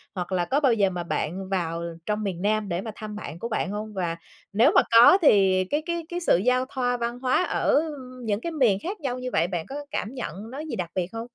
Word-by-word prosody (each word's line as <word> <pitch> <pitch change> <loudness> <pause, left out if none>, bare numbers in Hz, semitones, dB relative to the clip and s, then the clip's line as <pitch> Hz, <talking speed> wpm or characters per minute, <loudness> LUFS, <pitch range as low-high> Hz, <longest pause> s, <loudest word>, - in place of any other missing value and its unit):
hoặc 180 +1 -4
là 175 -2 +1
có 275 +3 +1
bao 270 -5 +4
giờ 200 -3 +3
mà 175 -1 -4
bạn 185 +3 -3
vào 170 -3 -2 0.2
trong 210 0 -1
miền 185 -3 -3
Nam 210 -1 0
để 175 +2 -1
mà 220 - -6
thăm 210 -1 -7
bạn 165 -5 -7
của 235 - -4
bạn 210 -3 -1
hông? 210 +1 -5
Và 170 -3 -2 0.4
nếu 235 +10 +5
mà - - +8
có 235 +11 +8
thì 190 - +5
cái 300 +1 0
cái 340 -2 -3
cái 350 0 -3
sự 335 - +3
giao 250 +5 +2
thoa 245 -2 -1
văn 240 +1 -3
hóa 255 +7 +2
ở 300 - +2 0.4
những 210 0 -1
cái 335 - -3
miền 245 -11 +3
khác 390 +3 -4
nhau 255 -2 -2
như 255 0 -4
vậy 165 +2 +2
bạn 175 -3 -3
có 275 - -6 0.2
cảm 225 - -3
nhận 225 -3 -6
nó 275 - -6
gì 310 -1 -5
đặc 175 -3 -3
biệt 180 -2 0
hông? 225 +1 -4
215 Hz, 255 wpm, -25 LUFS, 185-255 Hz, 0.4 s, mà